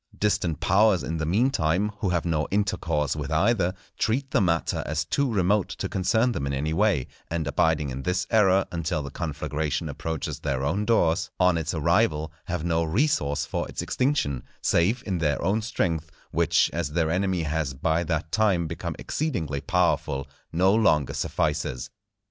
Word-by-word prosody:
Distant 100 Hz, -7 st, 0 dB
powers, 95 Hz, +2 st, +3 dB
in 80 Hz, +2 st, -3 dB
the 80 Hz, -1 st, -2 dB
mean 115 Hz, +10 st, +2 dB
time, 90 Hz, -, +1 dB
who 100 Hz, -, 0 dB
have 85 Hz, -1 st, 0 dB
no 80 Hz, -3 st, 0 dB
intercourse 85 Hz, -8 st, 0 dB
with 75 Hz, -2 st, -4 dB
either, 90 Hz, +2 st, +2 dB, 0.2 s
treat 130 Hz, +4 st, 0 dB
the 125 Hz, -, +3 dB
matter 85 Hz, -3 st, +1 dB
as 75 Hz, +2 st, -1 dB
too 125 Hz, -, 0 dB
remote 100 Hz, 0 st, +2 dB
to -, -, -2 dB
concern 110 Hz, +6 st, +1 dB
them 70 Hz, -11 st, -2 dB
in 70 Hz, -, -2 dB
any 75 Hz, +4 st, -1 dB
way; 95 Hz, -7 st, +2 dB, 0.2 s
and 80 Hz, -1 st, -2 dB
abiding 75 Hz, 0 st, +1 dB
in 65 Hz, +1 st, -5 dB
this 90 Hz, +3 st, -1 dB
error 95 Hz, -3 st, +4 dB
until 85 Hz, -2 st, -2 dB
the 70 Hz, -, -7 dB
conflagration 75 Hz, 0 st, -3 dB
approaches 80 Hz, +1 st, -4 dB
their 70 Hz, -2 st, -2 dB
own 95 Hz, +9 st, 0 dB
doors, 85 Hz, -7 st, +2 dB
on 90 Hz, -1 st, +4 dB
its 80 Hz, -1 st, -1 dB
arrival 75 Hz, 0 st, +2 dB
have -, -, -3 dB
no 85 Hz, -1 st, +1 dB
resource 80 Hz, -, +1 dB
for -, -, -3 dB
its -, -, -4 dB
extinction, 125 Hz, -, 0 dB, 0.2 s
save 110 Hz, +9 st, +2 dB
in 95 Hz, -4 st, -1 dB
their 75 Hz, -3 st, +1 dB
own 100 Hz, +6 st, +1 dB
strength, 85 Hz, -7 st, -1 dB, 0.2 s
which, 85 Hz, 0 st, +2 dB
as 75 Hz, -, -2 dB
their 80 Hz, -1 st, +1 dB
enemy 95 Hz, -1 st, 0 dB
has 75 Hz, -3 st, -2 dB
by 80 Hz, +5 st, +1 dB
that 80 Hz, -1 st, -2 dB
time 100 Hz, -6 st, +2 dB
become 80 Hz, +1 st, -4 dB
exceedingly 85 Hz, -, -2 dB
powerful, 80 Hz, -7 st, +1 dB, 0.3 s
no 95 Hz, +4 st, +3 dB
longer 90 Hz, -, +3 dB
suffices. -, -, -2 dB
85 Hz, 170 wpm, -26 LUFS, 75-100 Hz, 0.3 s, error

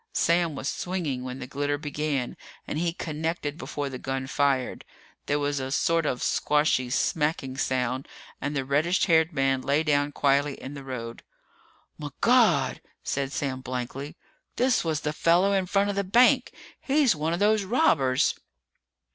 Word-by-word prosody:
Sam 170 Hz, -2 st, +2 dB
was 140 Hz, -, -4 dB
swinging 160 Hz, -10 st, -3 dB
when 130 Hz, 0 st, -5 dB
the 130 Hz, -, -6 dB
glitter 145 Hz, +2 st, -2 dB
began 145 Hz, -3 st, -3 dB, 0.3 s
and 150 Hz, -, -3 dB
he 170 Hz, 0 st, 0 dB
connected 160 Hz, -2 st, -3 dB
before 145 Hz, -3 st, -4 dB
the 130 Hz, -2 st, -6 dB
gun 135 Hz, 0 st, -3 dB
fired. 135 Hz, -1 st, 0 dB, 0.4 s
There 145 Hz, -, +1 dB
was 145 Hz, -1 st, -1 dB
a 130 Hz, 0 st, -4 dB
sort 165 Hz, +3 st, +1 dB
of 125 Hz, -, -2 dB
squashy, 150 Hz, -4 st, +1 dB
smacking 150 Hz, 0 st, 0 dB
sound 130 Hz, +1 st, -1 dB, 0.3 s
and 145 Hz, +1 st, -3 dB
the 135 Hz, -1 st, -1 dB
reddish 155 Hz, +7 st, +2 dB
haired 160 Hz, -2 st, +3 dB
man 135 Hz, -3 st, +1 dB
lay 140 Hz, +4 st, +1 dB
down 145 Hz, -1 st, +1 dB
quietly 140 Hz, 0 st, +1 dB
in 135 Hz, -, -8 dB
the 140 Hz, -1 st, -8 dB
road. 115 Hz, -3 st, -6 dB, 0.8 s
"Migawd!" -, -, +2 dB, 0.2 s
said 135 Hz, 0 st, -2 dB
Sam 135 Hz, -2 st, -3 dB
blankly. 130 Hz, +3 st, -5 dB, 0.4 s
"This 250 Hz, 0 st, +2 dB
was 160 Hz, -2 st, -1 dB
the 150 Hz, 0 st, -2 dB
fella 175 Hz, +5 st, +3 dB
in 190 Hz, -1 st, 0 dB
front 200 Hz, +2 st, +2 dB
of -, -, -6 dB
the 200 Hz, -, 0 dB
bank! 250 Hz, +6 st, +4 dB, 0.3 s
He's 280 Hz, -, +2 dB
one 155 Hz, +2 st, -1 dB
of 170 Hz, -, -2 dB
those 210 Hz, 0 st, +3 dB
robbers!" 150 Hz, -, +2 dB
145 Hz, 160 wpm, -26 LUFS, 135-170 Hz, 0.8 s, bank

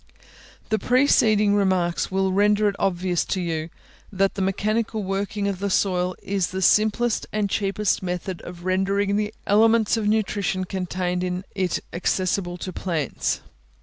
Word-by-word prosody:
The 220 Hz, 0 st, +1 dB
preceding 220 Hz, -5 st, +3 dB
remarks 185 Hz, -4 st, +1 dB
will 190 Hz, 0 st, 0 dB
render 210 Hz, +1 st, +3 dB
it 200 Hz, -, 0 dB
obvious 180 Hz, -2 st, 0 dB
to 190 Hz, -, -2 dB
you, 165 Hz, -2 st, -2 dB, 0.4 s
that 195 Hz, 0 st, +1 dB
the 200 Hz, -, -4 dB
mechanical 215 Hz, +3 st, -1 dB
working 200 Hz, +1 st, -2 dB
of 195 Hz, -2 st, -2 dB
the 200 Hz, +1 st, -1 dB
soil 185 Hz, -2 st, +1 dB
is 195 Hz, -3 st, 0 dB
the 190 Hz, 0 st, -3 dB
simplest 220 Hz, +3 st, +2 dB
and 210 Hz, -1 st, 0 dB
cheapest 200 Hz, 0 st, 0 dB
method 180 Hz, 0 st, -4 dB
of 175 Hz, 0 st, -10 dB
rendering 195 Hz, +2 st, +1 dB
the 210 Hz, 0 st, -1 dB
elements 225 Hz, +2 st, +4 dB
of 215 Hz, -2 st, -1 dB
nutrition 200 Hz, -3 st, 0 dB
contained 180 Hz, -1 st, -2 dB
in 180 Hz, +1 st, -2 dB
it 185 Hz, -3 st, -1 dB
accessible 180 Hz, 0 st, -1 dB
to 185 Hz, +1 st, -6 dB
plants. 165 Hz, -7 st, -2 dB
195 Hz, 150 wpm, -23 LUFS, 185-210 Hz, 0.4 s, elements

